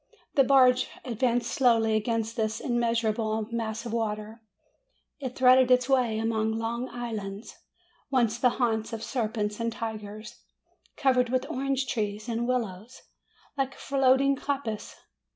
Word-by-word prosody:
The 275 - +5
barge 255 -1 +5 0.2
advanced 240 0 0
slowly 230 -4 +3
against 225 +1 -1
this 220 -1 -1
immeasurable 230 -2 0
mass 225 0 -3
of 230 - -5
water. 220 0 -3 0.8
It 260 -3 -5
threaded 255 0 +5
its 250 0 +4
way 250 -5 +2
among 220 0 0
long 235 +2 -3
islands, 220 -4 -6 0.5
once 240 -4 +1
the 250 - +4
haunts 225 -2 0
of 225 0 -5
serpents 215 -4 -2
and 230 0 -1
tigers, 220 0 -7 0.6
covered 255 -3 +3
with 255 +1 0
orange 270 0 -1
trees 215 -2 -3
and 235 0 -1
willows, 235 -1 -3 0.5
like 270 -1 -2
floating 275 0 +3
coppices. 270 -7 -4
235 Hz, 130 wpm, -27 LUFS, 220-255 Hz, 0.8 s, The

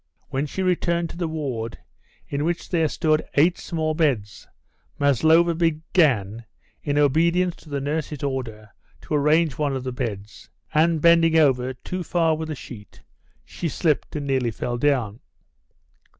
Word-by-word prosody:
When 135 +3 -2
she 190 +6 -3
returned 170 -2 0
to - - -11
the 175 -2 -2
ward, 130 -8 -4 0.5
in 140 +1 -2
which 170 +2 -2
there 165 -3 +2
stood 155 0 +1
eight 170 +5 +3
small 160 -2 -2
beds, 135 -11 -1 0.5
Maslova 160 +5 +4
began, 150 - +1 0.4
in 145 -1 -1
obedience 170 +5 +2
to 155 - -17
the 140 -1 -2
nurse's 150 0 -3
order, 115 -6 -4 0.3
to - - -6
arrange 150 0 +2
one 145 -2 0
of 130 - -4
the 130 - -3
beds; 110 -4 -6 0.2
and, 160 0 +3
bending 165 -1 +5
over 130 -4 +2
too 180 +8 -6
far 165 -2 +1
with 160 0 -5
the 155 - -4
sheet, 105 -6 -12 0.4
she 170 - -4
slipped 155 -1 -1
and 145 -1 -3
nearly 130 -3 0
fell 120 +2 -4
down. 125 -6 0
150 Hz, 150 wpm, -23 LUFS, 130-165 Hz, 0.5 s, bending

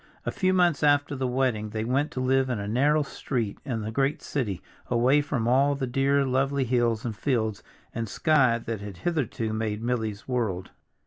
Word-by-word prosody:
A - - -1
few 185 -2 +1
months 175 -4 +3
after 145 -1 +3
the 130 -1 -1
wedding 125 -4 0
they 110 0 -3
went 135 +5 +1
to - - -3
live 130 +1 +2
in 125 - -1
a 100 0 -4
narrow 145 +7 +3
street 120 -6 -3
in 120 -5 -3
the 110 +1 -4
great 140 +6 0
city, 110 -11 -2 0.3
away 125 +4 +3
from 135 -6 -2
all 140 +3 +3
the 135 -1 -2
dear 135 +2 +2
lovely 135 +1 +1
hills 120 -3 +1
and 115 -3 -3
fields 110 -6 -1 0.3
and 115 -2 -3
sky 135 -6 +3
that 115 -2 -5
had 100 -3 -8
hitherto 125 -9 -1
made 110 0 -2
Milly's 110 -3 -2
world. 110 -8 -2
125 Hz, 190 wpm, -26 LUFS, 110-140 Hz, 0.3 s, months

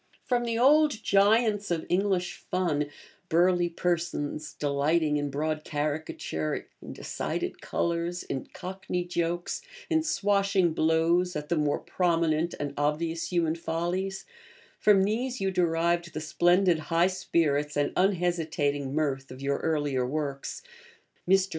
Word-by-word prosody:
From 240 -1 +1
the 230 -1 -1
old 295 0 +4
giants 205 +1 +3
of 170 -2 -1
English 185 -1 0
fun 155 -6 -1 0.4
burly 175 +1 +3
persons 165 -4 -2
delighting 150 +2 +1
in 145 0 -1
broad 155 +2 -2
caricature, 145 - -3
in - - -8
decided - - -4
colours, 170 +1 -1
in 135 - -4
cockney 185 -1 -4
jokes, 175 - -2 0.3
in 320 -1 +4
swashing 200 - +2
blows 165 +3 +2
at 150 0 -4
the 170 - +2
more 150 -2 +1
prominent 170 -2 0
and 145 -1 -3
obvious 160 +4 -1
human 170 -3 +2
follies 175 +4 -3 0.5
from 200 -2 +5
these 240 +5 -1
you 195 0 0
derived 170 -1 +1
the - - -1
splendid 175 +2 +3
high 170 +1 +4
spirits 155 -6 0
and 145 - +1
unhesitating 160 -7 0
mirth 135 -3 -1
of 130 - -10
your 140 +1 -1
earlier 145 -5 0
works. 140 - -3 0.7
Mr. 190 0 +4
170 Hz, 130 wpm, -28 LUFS, 150-185 Hz, 0.7 s, from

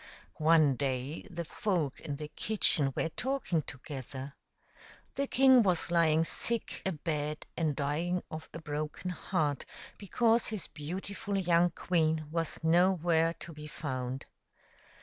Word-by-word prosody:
One 155 -4 +5
day 135 +5 -2
the 170 -2 -5
folk 160 -6 -1
in 145 - -4
the 150 +1 -6
kitchen 155 -7 +2
were 165 - 0
talking 255 - -1
together. 135 0 -7 0.8
The 280 0 -1
king 260 -1 +6
was 180 -4 +1
lying 165 -2 +4
sick 230 +6 -1
abed 150 -3 -2
and 155 -4 0
dying 165 +6 -1
of 155 0 -7
a - - -7
broken 155 +3 -4
heart 155 -5 -1 0.4
because 225 +3 +2
his 215 -4 -3
beautiful 195 +6 -4
young 175 -2 +4
queen 160 -2 0
was 165 0 -2
nowhere 170 -1 +3
to 170 - -7
be 150 0 -9
found. 130 -4 -4
165 Hz, 130 wpm, -31 LUFS, 150-180 Hz, 0.8 s, king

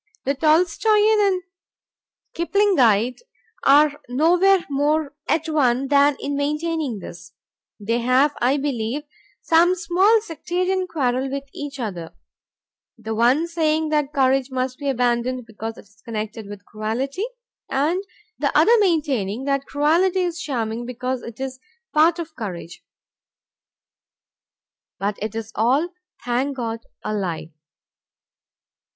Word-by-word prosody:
The 275 - +2
Tolstoian 405 +8 +3
and 370 -2 0 0.9
Kiplingite 270 - +2 0.4
are 290 +1 +5
nowhere 350 +8 +3
more 290 +1 0 0.2
at 320 0 +1
one 270 -4 +1
than 285 0 +4
in 285 - -3
maintaining 300 -2 -1
this. 170 -2 -10 0.5
They 230 +3 -1
have, 255 +4 +3
I 255 +4 +3
believe, 270 -1 -2 0.4
some 345 +2 +4
small 370 +6 +3
sectarian 365 +1 -2
quarrel 265 -5 -1
with 275 +1 -4
each 285 -1 -7
other, 180 -8 -5 0.8
the 220 -1 -5
one 250 +9 +3
saying 315 -2 0
that 300 -2 0
courage 270 -2 +2
must 255 -1 -3
be 285 -1 -2
abandoned 245 0 0
because 225 0 -7
it - - -13
is 205 +1 -27
connected 220 -1 -5
with 205 0 -10
cruelty, 255 - -3 0.4
and 320 +8 0 0.4
the - - +1
other 470 - +6
maintaining 275 - 0
that 275 0 -1
cruelty 340 +6 +2
is 350 -1 -2
charming 235 -4 -3
because 250 +1 -3
it 230 +1 -10
is 260 -1 -5
a - - -48 0.3
part 320 +2 +5
of 330 -2 -7
courage. 180 -7 -7 2.1
But 200 +1 -2
it 215 +1 -4
is 225 -1 -5
all, 260 +10 +2 0.4
thank 260 +3 -1
God, 230 -2 -3 0.2
a 215 - -2
lie. 175 -5 -3
275 Hz, 125 wpm, -22 LUFS, 235-320 Hz, 2.1 s, other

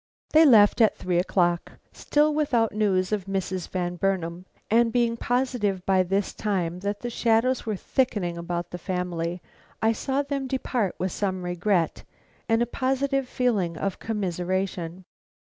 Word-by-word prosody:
They 315 +1 +7
left 215 -2 +6
at 220 - +4
three 180 -1 0
o'clock, 175 -1 +1 0.2
still 300 +1 +2
without 260 -7 +1
news 195 -3 +1
of 205 -3 -1
Mrs. 190 -2 -3
Van 180 -1 -2
Burnam; 180 -1 -2 0.2
and 230 +1 +3
being 235 -1 +2
positive 240 -6 -1
by 190 -1 +4
this 195 +2 -1
time 180 -5 -2
that 200 +2 -3
the 240 - -3
shadows 235 +2 +1
were 215 - 0
thickening 195 -6 -1
about 170 0 -4
this 180 - -7
family, 180 -2 -3 0.4
I 220 - +3
saw 270 +5 -1
them 280 -1 -3
depart 250 -6 -1
with 185 0 -2
some 190 -1 -2
regret 175 0 0 0.5
and 225 +1 +3
a - - 0
positive 270 +2 -1
feeling 200 -10 0
of 195 +2 -3
commiseration. 185 -3 -3
195 Hz, 150 wpm, -25 LUFS, 180-235 Hz, 0.5 s, They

